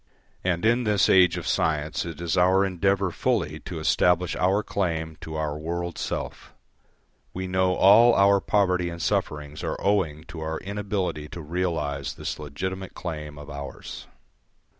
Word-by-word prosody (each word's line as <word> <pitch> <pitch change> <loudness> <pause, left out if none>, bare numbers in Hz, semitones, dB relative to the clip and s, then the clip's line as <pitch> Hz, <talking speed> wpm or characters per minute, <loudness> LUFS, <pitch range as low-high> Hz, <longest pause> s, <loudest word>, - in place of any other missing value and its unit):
And 90 +1 0
in 120 +2 +3
this 105 -3 +3
age 90 -2 +5
of 85 - -5
science 75 -1 0
it 85 -3 -7
is 85 0 -1
our 95 +2 +4
endeavour 95 0 +1
fully 85 -10 -1
to 85 - -5
establish 90 +2 +2
our 95 +3 +2
claim 80 -5 -2
to 80 - -7
our 75 -1 -2
world 85 +2 -4
self. - - -5 0.8
We 95 +1 -3
know 95 0 +1
all 115 +6 +7
our 100 0 +5
poverty 90 -4 +1
and 85 0 -7
sufferings 75 -2 -2
are - - -3
owing 85 -7 0
to 85 0 -9
our 80 0 -3
inability 100 -6 -3
to 85 - -7
realise 75 -4 -2
this - - -5
legitimate 95 +6 -5
claim 75 -4 -6
of 75 0 -9
ours. 70 -1 -8
90 Hz, 155 wpm, -25 LUFS, 80-95 Hz, 0.8 s, all